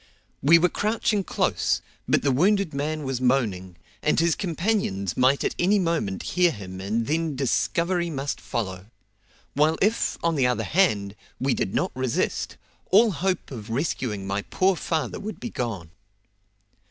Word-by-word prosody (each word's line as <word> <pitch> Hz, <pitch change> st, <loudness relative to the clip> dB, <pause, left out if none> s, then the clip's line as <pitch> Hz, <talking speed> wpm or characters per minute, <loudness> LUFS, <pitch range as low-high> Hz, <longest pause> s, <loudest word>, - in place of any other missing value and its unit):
We 160 Hz, +5 st, +7 dB
were 175 Hz, +2 st, +4 dB
crouching 210 Hz, +1 st, 0 dB
close, -, -, 0 dB, 0.3 s
but -, -, +2 dB
the 140 Hz, -, +3 dB
wounded 190 Hz, +5 st, +2 dB
man 150 Hz, +2 st, -2 dB
was 130 Hz, -2 st, -3 dB
moaning, 105 Hz, -9 st, 0 dB, 0.3 s
and 150 Hz, -, +2 dB
his 165 Hz, 0 st, +3 dB
companions 170 Hz, -, -1 dB
might 130 Hz, +2 st, +3 dB
at -, -, 0 dB
any 195 Hz, +4 st, +4 dB
moment 165 Hz, -, -1 dB
hear 180 Hz, -1 st, +3 dB
him 95 Hz, -, -7 dB
and 110 Hz, +4 st, -1 dB
then 160 Hz, +1 st, -1 dB
discovery 170 Hz, +6 st, 0 dB
must 140 Hz, -2 st, -3 dB
follow; 95 Hz, -4 st, -4 dB, 0.7 s
while 155 Hz, +3 st, +3 dB
if, 215 Hz, +4 st, +1 dB
on 170 Hz, 0 st, +2 dB
the 135 Hz, -5 st, +2 dB
other 125 Hz, -, 0 dB
hand, 105 Hz, -, +1 dB, 0.2 s
we 130 Hz, 0 st, +1 dB
did 95 Hz, -, -2 dB
not -, -, 0 dB
resist, 130 Hz, -2 st, -1 dB, 0.3 s
all 215 Hz, +4 st, +6 dB
hope 185 Hz, -2 st, -2 dB
of 115 Hz, -4 st, -7 dB
rescuing 115 Hz, -, -2 dB
my 100 Hz, +1 st, -1 dB
poor 185 Hz, -, +1 dB
father 160 Hz, -2 st, -2 dB
would 215 Hz, +1 st, -6 dB
be 240 Hz, -, -5 dB
gone. 100 Hz, -10 st, -4 dB
145 Hz, 155 wpm, -25 LUFS, 115-175 Hz, 0.7 s, We